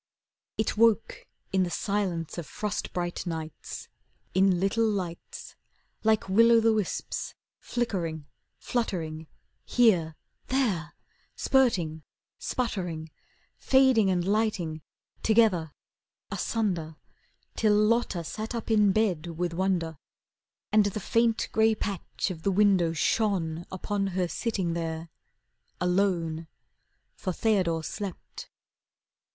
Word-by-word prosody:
It 220 Hz, -, 0 dB
woke 225 Hz, 0 st, +2 dB, 0.3 s
in 190 Hz, -, +3 dB
the 180 Hz, -, +1 dB
silence 180 Hz, -4 st, -2 dB
of 165 Hz, -, -6 dB
frost 210 Hz, -2 st, -3 dB
bright 175 Hz, 0 st, -3 dB
nights, 160 Hz, -2 st, -6 dB, 0.5 s
In 190 Hz, -1 st, +4 dB
little 195 Hz, +5 st, +1 dB
lights, 180 Hz, -5 st, -5 dB, 0.5 s
Like 220 Hz, -2 st, +2 dB
will 230 Hz, +5 st, +5 dB
o' 230 Hz, -, +7 dB
the 225 Hz, 0 st, +4 dB
wisps 215 Hz, -3 st, -3 dB, 0.2 s
flickering, 170 Hz, -10 st, -2 dB, 0.3 s
fluttering, 165 Hz, -9 st, -3 dB, 0.4 s
Here 180 Hz, -10 st, +3 dB, 0.3 s
there 205 Hz, -11 st, 0 dB, 0.4 s
Spurting, 185 Hz, -, +2 dB, 0.4 s
sputtering, 175 Hz, -10 st, -3 dB, 0.5 s
Fading 260 Hz, -6 st, +4 dB
and 175 Hz, -2 st, +1 dB
lighting, 200 Hz, -7 st, 0 dB, 0.4 s
Together, 210 Hz, -8 st, +3 dB, 0.6 s
asunder 175 Hz, -9 st, -1 dB, 0.6 s
Till 215 Hz, -2 st, +3 dB
Lotta 210 Hz, -4 st, +2 dB
sat 215 Hz, +8 st, -5 dB
up 230 Hz, 0 st, -4 dB
in 210 Hz, -2 st, +5 dB
bed 185 Hz, -6 st, +1 dB
with 175 Hz, -1 st, -1 dB
wonder, 170 Hz, -4 st, -1 dB, 0.7 s
And 210 Hz, -1 st, +5 dB
the 205 Hz, +1 st, -3 dB
faint 230 Hz, +2 st, +1 dB
grey 220 Hz, 0 st, +4 dB
patch 200 Hz, -1 st, -3 dB
of 165 Hz, -3 st, -7 dB
the 200 Hz, -, +1 dB
window 190 Hz, -4 st, +4 dB
shone 170 Hz, -2 st, 0 dB
Upon 195 Hz, +1 st, -2 dB
her 185 Hz, -1 st, -1 dB
sitting 190 Hz, -4 st, -1 dB
there, 165 Hz, -1 st, -4 dB, 0.7 s
alone. 180 Hz, -3 st, 0 dB, 0.7 s
For 185 Hz, -, -3 dB
Theodore 180 Hz, -5 st, +1 dB
slept. 195 Hz, +2 st, -7 dB
190 Hz, 110 wpm, -28 LUFS, 170-220 Hz, 0.7 s, o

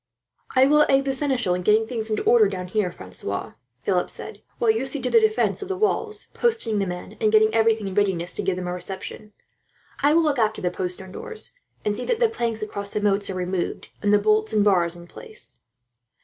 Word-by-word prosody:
"I 260 Hz, +1 st, +6 dB
will 300 Hz, +2 st, +5 dB
aid 275 Hz, 0 st, +4 dB
the 270 Hz, -, 0 dB
seneschal 260 Hz, -8 st, 0 dB
in 180 Hz, -, -1 dB
getting 215 Hz, +4 st, +3 dB
things 225 Hz, -1 st, -3 dB
into 215 Hz, -, -1 dB
order 230 Hz, -3 st, +5 dB
down 185 Hz, -2 st, -4 dB
here, 200 Hz, -2 st, 0 dB
Francois," 95 Hz, -, -5 dB, 0.3 s
Philip 180 Hz, -2 st, +1 dB
said, 210 Hz, -2 st, -7 dB, 0.2 s
"while 230 Hz, -2 st, +3 dB
you 230 Hz, +5 st, -1 dB
see 285 Hz, +2 st, 0 dB
to 250 Hz, -1 st, -1 dB
the -, -, +7 dB
defence 435 Hz, 0 st, +1 dB
of 400 Hz, -, -5 dB
the 385 Hz, -1 st, -3 dB
walls, 425 Hz, +1 st, -1 dB
posting 455 Hz, -, +1 dB
the 195 Hz, -, 0 dB
men, 180 Hz, +4 st, -7 dB
and 215 Hz, -1 st, +3 dB
getting 220 Hz, 0 st, +4 dB
everything 225 Hz, -2 st, +2 dB
in 190 Hz, -, -4 dB
readiness 185 Hz, -4 st, +1 dB
to -, -, -2 dB
give 190 Hz, -1 st, 0 dB
them 180 Hz, 0 st, -5 dB
a 180 Hz, -, -2 dB
reception. 190 Hz, +3 st, -7 dB, 0.7 s
I 290 Hz, +2 st, +4 dB
will 335 Hz, -, +5 dB
look 290 Hz, -4 st, +1 dB
after 220 Hz, -1 st, +1 dB
the 180 Hz, -, -1 dB
postern 185 Hz, 0 st, -4 dB
doors, 450 Hz, -, -7 dB, 0.3 s
and 210 Hz, 0 st, +1 dB
see 245 Hz, -, -3 dB
that 465 Hz, -, 0 dB
the 470 Hz, -2 st, +4 dB
planks 230 Hz, -, -2 dB
across 200 Hz, -1 st, -4 dB
the 210 Hz, -, -2 dB
moats 200 Hz, -1 st, +1 dB
are 190 Hz, -, -3 dB
removed, 180 Hz, 0 st, -3 dB
and 205 Hz, -, +2 dB
the 210 Hz, -, +6 dB
bolts 215 Hz, +1 st, +2 dB
and 210 Hz, -1 st, +3 dB
bars 175 Hz, -4 st, +3 dB
in 175 Hz, 0 st, -11 dB
place." 440 Hz, -, -6 dB
215 Hz, 225 wpm, -24 LUFS, 190-265 Hz, 0.7 s, the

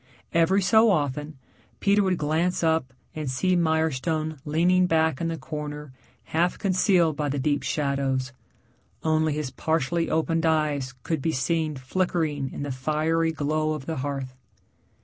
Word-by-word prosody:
Every 180 Hz, +4 st, +3 dB
so 220 Hz, +4 st, +5 dB
often 150 Hz, -4 st, -1 dB, 0.4 s
Peter 200 Hz, +1 st, +3 dB
would 190 Hz, -2 st, +1 dB
glance 165 Hz, +4 st, 0 dB
up 160 Hz, -5 st, +1 dB, 0.2 s
and 155 Hz, -3 st, -4 dB
see 180 Hz, +8 st, +1 dB
Mirestone 160 Hz, -2 st, 0 dB
leaning 175 Hz, +4 st, +3 dB
back 160 Hz, -3 st, +1 dB
in 165 Hz, -, 0 dB
the 165 Hz, 0 st, -3 dB
corner 150 Hz, -2 st, -6 dB, 0.3 s
half 170 Hz, +3 st, 0 dB
concealed 185 Hz, -4 st, +2 dB
by 145 Hz, -1 st, -1 dB
the 140 Hz, -, -2 dB
deep 145 Hz, +1 st, 0 dB
shadows 140 Hz, -2 st, -1 dB, 0.7 s
only 155 Hz, -1 st, +2 dB
his 150 Hz, -3 st, -3 dB
partially 165 Hz, +3 st, 0 dB
opened 160 Hz, 0 st, 0 dB
eyes 145 Hz, -5 st, 0 dB
could 160 Hz, -4 st, -2 dB
be 160 Hz, -, 0 dB
seen 155 Hz, +3 st, 0 dB
flickering 150 Hz, -1 st, -1 dB
in -, -, -5 dB
the 145 Hz, -, -3 dB
fiery 155 Hz, +5 st, 0 dB
glow 155 Hz, 0 st, -1 dB
of 150 Hz, -3 st, -6 dB
the 160 Hz, 0 st, -3 dB
hearth. 135 Hz, -1 st, -4 dB
155 Hz, 150 wpm, -25 LUFS, 145-165 Hz, 0.7 s, so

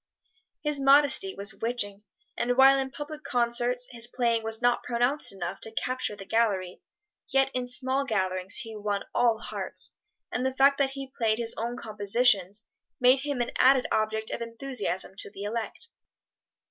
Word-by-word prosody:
His 295 Hz, -2 st, 0 dB
modesty 275 Hz, -7 st, +4 dB
was 200 Hz, +1 st, -2 dB
witching, 205 Hz, -2 st, -2 dB, 0.3 s
and 245 Hz, +1 st, 0 dB
while 270 Hz, +1 st, +7 dB
in 265 Hz, 0 st, -2 dB
public 295 Hz, +2 st, -8 dB
concerts 245 Hz, +1 st, +1 dB
his 235 Hz, -1 st, 0 dB
playing 235 Hz, -2 st, 0 dB
was 220 Hz, 0 st, -2 dB
not 245 Hz, 0 st, +2 dB
pronounced 245 Hz, +5 st, 0 dB
enough 190 Hz, -1 st, -5 dB
to 225 Hz, -, -6 dB
capture 255 Hz, -1 st, -2 dB
the 195 Hz, -, -10 dB
gallery, 195 Hz, -6 st, 0 dB, 0.5 s
yet 270 Hz, -1 st, +2 dB
in 250 Hz, -1 st, -2 dB
small 260 Hz, +2 st, 0 dB
gatherings 190 Hz, -6 st, -1 dB
he 225 Hz, -4 st, -5 dB
won 205 Hz, -1 st, -2 dB
all 235 Hz, -2 st, +3 dB
hearts, -, -, -5 dB, 0.4 s
and 250 Hz, -, -1 dB
the 260 Hz, 0 st, -1 dB
fact 275 Hz, +1 st, +4 dB
that 275 Hz, -1 st, +3 dB
he 270 Hz, -1 st, -7 dB
played 220 Hz, -2 st, +1 dB
his 230 Hz, -1 st, -2 dB
own 235 Hz, +2 st, -3 dB
compositions 210 Hz, -2 st, +2 dB, 0.4 s
made 255 Hz, +2 st, +5 dB
him 280 Hz, -2 st, -2 dB
an 240 Hz, -, -2 dB
added 260 Hz, 0 st, +5 dB
object 220 Hz, 0 st, -1 dB
of -, -, -4 dB
enthusiasm 230 Hz, -5 st, -3 dB
to -, -, -4 dB
the 200 Hz, 0 st, -8 dB
elect. 230 Hz, -, -5 dB
240 Hz, 165 wpm, -27 LUFS, 215-265 Hz, 0.5 s, while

